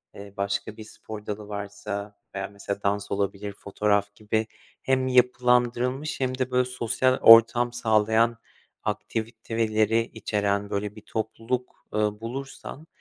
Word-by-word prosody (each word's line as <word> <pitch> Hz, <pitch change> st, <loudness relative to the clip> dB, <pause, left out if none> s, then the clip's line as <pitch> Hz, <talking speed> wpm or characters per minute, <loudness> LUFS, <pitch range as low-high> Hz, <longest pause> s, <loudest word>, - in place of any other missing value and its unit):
eee, 100 Hz, 0 st, -10 dB
başka 100 Hz, +2 st, -2 dB
bir 110 Hz, -, -8 dB
spor 105 Hz, 0 st, -10 dB
dalı 105 Hz, 0 st, -5 dB
varsa 100 Hz, 0 st, -5 dB, 0.2 s
veya 95 Hz, 0 st, -2 dB
mesela, 100 Hz, 0 st, -6 dB
dans 100 Hz, 0 st, -1 dB
olabilir, 100 Hz, 0 st, -2 dB
fotoğraf 100 Hz, 0 st, 0 dB
gibi 110 Hz, +1 st, -1 dB, 0.3 s
hem 130 Hz, -1 st, +1 dB
yapılandırılmış 125 Hz, +2 st, +2 dB
hem 130 Hz, -1 st, -1 dB
de 130 Hz, -1 st, -1 dB
böyle 125 Hz, 0 st, +3 dB
sosyal 125 Hz, +1 st, +1 dB
ortam 115 Hz, +1 st, +8 dB
sağlayan 110 Hz, 0 st, +2 dB, 0.5 s
aktiviteleri 115 Hz, -1 st, 0 dB
içeren 100 Hz, -2 st, -1 dB
böyle 100 Hz, +1 st, -3 dB
bir 110 Hz, -, -11 dB
topluluk, 115 Hz, +4 st, -4 dB
ııı, 105 Hz, 0 st, 0 dB
bulursan, 135 Hz, +5 st, -7 dB
110 Hz, 125 wpm, -26 LUFS, 100-125 Hz, 0.5 s, ortam